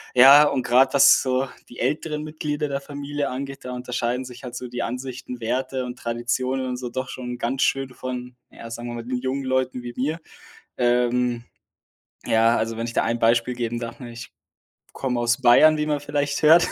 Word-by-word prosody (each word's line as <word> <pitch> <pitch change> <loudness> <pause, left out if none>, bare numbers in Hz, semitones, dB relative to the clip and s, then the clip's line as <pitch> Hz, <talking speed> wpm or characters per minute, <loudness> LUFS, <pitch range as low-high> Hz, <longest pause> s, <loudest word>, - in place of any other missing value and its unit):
Ja, 135 +4 +9
und 130 - -1
grad, 130 +2 +4
was 140 - +7
so 130 +1 0 0.2
die 120 - -12
älteren 150 +3 -1
Mitglieder 150 -1 -3
der 140 0 -2
Familie 145 0 -4
angeht, 135 +1 -6
da 125 - -5
unterscheiden 125 0 -2
sich 125 -1 -11
halt 125 -1 -7
so 125 - -5
die 125 - -3
Ansichten, 125 +1 -6
Werte 130 +2 -2
und 125 0 -7
Traditionen 125 +3 -2
und 125 -1 -3
so 125 -1 -5
doch 130 +1 -4
schon 125 -1 -6
ganz 130 +3 0
schön 135 -1 +1
von, 125 -1 -6 0.2
ja, 115 - -10
sagen 120 +1 -6
wir 120 - -5
mal, 115 - -6
den 125 +1 -2
jungen 130 +2 -2
Leuten 130 -1 0
wie 120 - -6
mir. 155 +6 -2 0.6
Ähm, 120 0 +1 0.8
ja, 115 +1 +3
also, 110 +1 -2
wenn 115 +1 -3
ich 120 - -6
da - - +2
ein 115 +1 -1
Beispiel 115 +2 +2
geben 120 -1 -3
darf, 120 0 -7
ne, 120 -2 -8
ich 115 -1 -10 0.6
komme 125 -3 -2
aus 120 +2 +1
Bayern, 145 +5 +6
wie 150 - 0
man 150 -1 0
vielleicht 145 0 -2
hört 165 +3 +7
125 Hz, 200 wpm, -23 LUFS, 120-135 Hz, 0.8 s, Ja